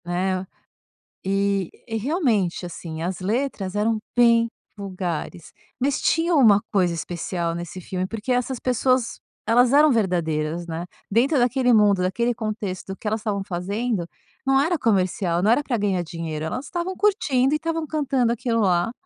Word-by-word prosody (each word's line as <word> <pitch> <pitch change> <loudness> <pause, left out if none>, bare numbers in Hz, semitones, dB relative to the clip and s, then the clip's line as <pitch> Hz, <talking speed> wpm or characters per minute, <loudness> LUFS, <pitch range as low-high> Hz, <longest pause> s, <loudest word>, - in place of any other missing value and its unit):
Né? 185 +1 -1 0.8
E 195 -1 0 0.2
e 225 -2 -3
realmente, 225 - 0
assim, 165 -2 -6
as 180 +2 -3
letras 205 -1 -2
eram 215 +2 +1 0.2
bem 230 -1 +5 0.3
vulgares, 180 -4 -5 0.3
mas 270 +2 0
tinha 335 +2 +2
uma 220 -9 +6
coisa 180 -4 +2
especial 170 0 -3
nesse 175 +2 -6
filme 185 +1 -3
porque 225 +5 -3
essas 250 +1 -1
pessoas, 255 0 0 0.3
elas 245 +3 +4
eram 300 0 +6
verdadeiras, 170 -6 0
né? 170 +1 -5 0.2
Dentro 260 +8 +3
daquele 245 +1 +3
mundo, 205 -3 +4
daquele 235 +7 +1
contexto, 210 -5 -4
o - - -7
que - - -11
elas 215 +1 0
estavam 205 -2 -2
fazendo 200 +2 -2 0.4
não 270 0 +4
era 330 +4 +1
comercial, 185 -6 +1
não 210 - +3
era 245 +5 +4
pra 260 -4 -1
ganhar 200 -4 0
dinheiro. 160 -2 -5
Elas 250 - -4
estavam 350 +4 -4
curtindo 285 -11 +2
e - - +3
estavam 325 0 -2
cantando 270 -6 +1
aquilo 235 0 -1
lá, 180 -1 +2
210 Hz, 155 wpm, -23 LUFS, 180-250 Hz, 0.8 s, uma